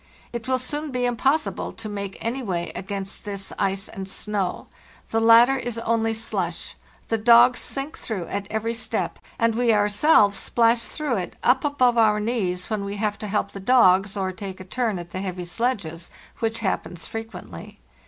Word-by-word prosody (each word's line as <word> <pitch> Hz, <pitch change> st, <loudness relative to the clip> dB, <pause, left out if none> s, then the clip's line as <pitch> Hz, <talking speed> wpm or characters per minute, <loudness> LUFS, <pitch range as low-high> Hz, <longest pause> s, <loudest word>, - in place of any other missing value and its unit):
It 235 Hz, 0 st, -5 dB
will 260 Hz, 0 st, +2 dB
soon 295 Hz, +4 st, -4 dB
be 250 Hz, -2 st, -1 dB
im 245 Hz, -1 st, 0 dB
possible 290 Hz, +6 st, 0 dB
to 225 Hz, -1 st, -8 dB
make 200 Hz, -2 st, -5 dB
any 245 Hz, +4 st, -1 dB
way 175 Hz, -7 st, -3 dB
against 195 Hz, 0 st, -5 dB
this 200 Hz, -2 st, -6 dB
ice 195 Hz, 0 st, 0 dB
and 195 Hz, 0 st, -7 dB
snow. 200 Hz, -2 st, -2 dB, 0.5 s
The 225 Hz, -, +2 dB
latter 230 Hz, +4 st, +7 dB
is 240 Hz, -3 st, -4 dB
only 225 Hz, -1 st, 0 dB
slush; 220 Hz, -, -3 dB, 0.4 s
the 225 Hz, -, +1 dB
dogs 240 Hz, +2 st, +6 dB
sink 275 Hz, +2 st, -4 dB
through 195 Hz, -7 st, -4 dB
at 200 Hz, +3 st, -4 dB
every 220 Hz, +1 st, -1 dB
step, 230 Hz, -, -2 dB, 0.2 s
and 230 Hz, -1 st, +2 dB
we 235 Hz, +1 st, +2 dB
ourselves 205 Hz, +1 st, +4 dB
splash 230 Hz, 0 st, +2 dB
through 290 Hz, -7 st, -2 dB
it 180 Hz, -, -4 dB
up 255 Hz, +2 st, +4 dB
above 255 Hz, -5 st, +3 dB
our 210 Hz, -2 st, +4 dB
knees 200 Hz, -5 st, -1 dB
when 215 Hz, -2 st, -2 dB
we 200 Hz, 0 st, -4 dB
have 205 Hz, 0 st, -2 dB
to 210 Hz, -, -5 dB
help 200 Hz, -1 st, -1 dB
the 195 Hz, -, -8 dB
dogs 195 Hz, -3 st, +4 dB
or 190 Hz, -1 st, -1 dB
take 190 Hz, 0 st, -7 dB
a -, -, -7 dB
turn 225 Hz, 0 st, -1 dB
at 175 Hz, -1 st, -8 dB
the 185 Hz, -, -4 dB
heavy 180 Hz, -2 st, -4 dB
sledges, 175 Hz, -6 st, -2 dB, 0.3 s
which 225 Hz, 0 st, -1 dB
happens 180 Hz, -4 st, -2 dB
frequently. 200 Hz, -, -8 dB
220 Hz, 185 wpm, -24 LUFS, 195-240 Hz, 0.5 s, latter